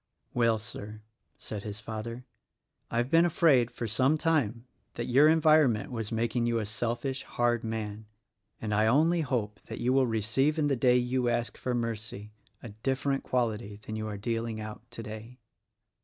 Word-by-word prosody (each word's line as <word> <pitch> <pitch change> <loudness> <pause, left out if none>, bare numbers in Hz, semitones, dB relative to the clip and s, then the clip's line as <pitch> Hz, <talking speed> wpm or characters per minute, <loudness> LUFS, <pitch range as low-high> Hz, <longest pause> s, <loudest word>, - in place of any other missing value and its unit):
"Well, 115 -2 +3
Sir," 105 0 -8 0.3
said 105 -2 -6
his 105 0 -6
father, 115 +3 -6 0.6
"I've 120 +2 -1
been 165 +1 +6
afraid, 155 -8 +4
for 120 - -5
some 130 +8 +2
time, 130 -8 0 0.3
that 120 - -3
your 135 +5 +5
environment 155 -8 +4
was 110 -4 -4
making 115 +1 0
you 120 -1 +1
a 110 - -1
selfish, 120 +5 -2
hard 120 -1 0
man; 110 -1 -4 0.5
and 105 -1 -3
I 110 +1 +3
only 160 +8 +4
hope 115 -7 -2
that - - -6
you 125 +1 +1
will 135 -1 +4
receive 115 +7 +1
in 150 -2 +2
the 140 - +2
day 125 0 +4
you 125 0 +1
ask 120 0 -1
for 125 -1 -2
mercy, 110 -3 -4 0.3
a 120 - -7
different 135 +6 -1
quality 115 -4 -1
than 110 - -5
you 110 0 -3
are 105 -1 -4
dealing 115 +1 -2
out 110 0 -7
today." 115 +1 -8
120 Hz, 170 wpm, -29 LUFS, 110-130 Hz, 0.6 s, been